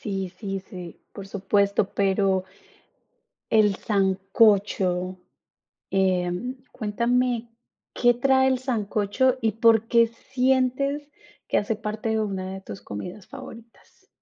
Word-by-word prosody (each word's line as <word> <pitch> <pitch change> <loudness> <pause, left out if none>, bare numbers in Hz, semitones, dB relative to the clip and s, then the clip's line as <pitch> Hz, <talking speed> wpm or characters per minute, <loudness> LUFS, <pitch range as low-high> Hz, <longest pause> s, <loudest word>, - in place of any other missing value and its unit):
Sí, 195 -3 -3
sí, 195 -3 -4
sí, 180 -3 -10
por 195 - -8
supuesto, 200 0 +1
pero 195 -1 +1 1.1
el 210 -3 +4
sancocho, 195 -2 +2 0.7
eh, 185 -2 +2 0.4
cuéntame, 240 +2 0 0.5
¿qué 240 0 +4
trae 265 +2 +3
el 260 -1 +2
sancocho 235 0 0
y 225 -1 +1
por 225 0 +4
qué 230 0 +4
sientes 260 +4 0 0.4
que - - +2
hace 210 +1 -1
parte 215 +1 -4
de 220 0 +1
una 190 -3 -3
de 190 - -7
tus 100 - -9
comidas 180 - -8
favoritas? 235 -4 -13
210 Hz, 115 wpm, -25 LUFS, 195-240 Hz, 1.1 s, el